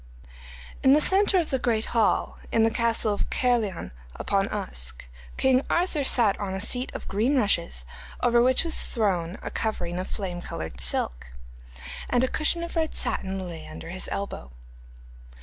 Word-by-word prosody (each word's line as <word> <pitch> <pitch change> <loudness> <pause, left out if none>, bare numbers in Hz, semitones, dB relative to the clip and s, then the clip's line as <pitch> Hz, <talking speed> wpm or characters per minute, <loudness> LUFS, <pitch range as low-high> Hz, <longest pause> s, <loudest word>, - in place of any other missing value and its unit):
In 265 - +6
the 295 - +6
centre 385 +4 +4
of 340 -3 0
the 265 - +1
great 225 -3 +1
hall 225 -3 +1
in 225 - +3
the 225 - +3
castle 230 -2 +1
of 205 - -2
Caerleon 235 -8 0 0.2
upon - - 0
Usk, - - -4 0.3
king 260 -1 +4
Arthur 340 -4 +1
sat 230 -6 +4
on 195 -2 -3
a - - -3
seat 245 +5 0
of - - -6
green 225 +8 +1
rushes, 170 - +1 0.3
over 240 -1 +4
which 255 +1 +3
was 330 -1 -1
thrown 190 -6 -1
a - - -5
covering 180 -6 -2
of 185 - -4
flame 180 -4 -4
coloured 80 - -6
silk, - - -1 0.8
and 245 0 +3
a - - +3
cushion 325 +5 +1
of 340 - -6
red 320 -1 0
satin 190 -1 -2
lay 165 -2 -7
under - - -9
his 185 +1 -4
elbow. 200 - -4
220 Hz, 165 wpm, -26 LUFS, 180-260 Hz, 0.8 s, In